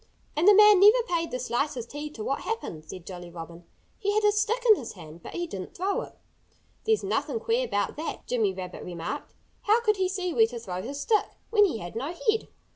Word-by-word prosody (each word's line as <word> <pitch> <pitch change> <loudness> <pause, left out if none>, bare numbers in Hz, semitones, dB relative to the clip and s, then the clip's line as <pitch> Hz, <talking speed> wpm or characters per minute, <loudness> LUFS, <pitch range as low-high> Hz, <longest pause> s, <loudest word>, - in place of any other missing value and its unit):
"And 320 +5 +2
the 415 - +9
man 420 -1 +8
never 425 +5 +7
paid 335 -3 0
the 250 - -3
slightest 245 0 -2
heed 295 +1 -6
to 215 - -5
what 275 +5 -1
happened," 170 - -5
said 180 0 -9
Jolly 175 -2 -8
Robin. 170 0 -10 0.3
"He 410 -1 0
had 430 - +2
a 415 - +5
stick 430 +3 0
in 435 - +9
his 250 - -7
hand; 165 -2 -12
but - - -9
he 345 - -1
didn't 195 - -7
throw 385 +2 0
it." - - -11 0.7
"There's 440 -1 +2
nothing 460 - -1
queer 480 +2 0
about 205 - -1
that," 315 - -5
Jimmy 225 -5 +1
Rabbit 185 -1 -7
remarked. 175 - -6 0.3
"How 430 +3 +5
could 425 -3 +2
he 375 -1 +1
see 370 -2 -2
where 225 -4 +5
to 240 +1 -7
throw 185 -6 -5
his 275 +7 -6
stick, 425 +8 +2 0.2
when 420 -2 +6
he 330 - -1
had 175 -1 -8
no 280 +9 -3 0.2
head?" 445 - -3
295 Hz, 225 wpm, -27 LUFS, -, 0.7 s, the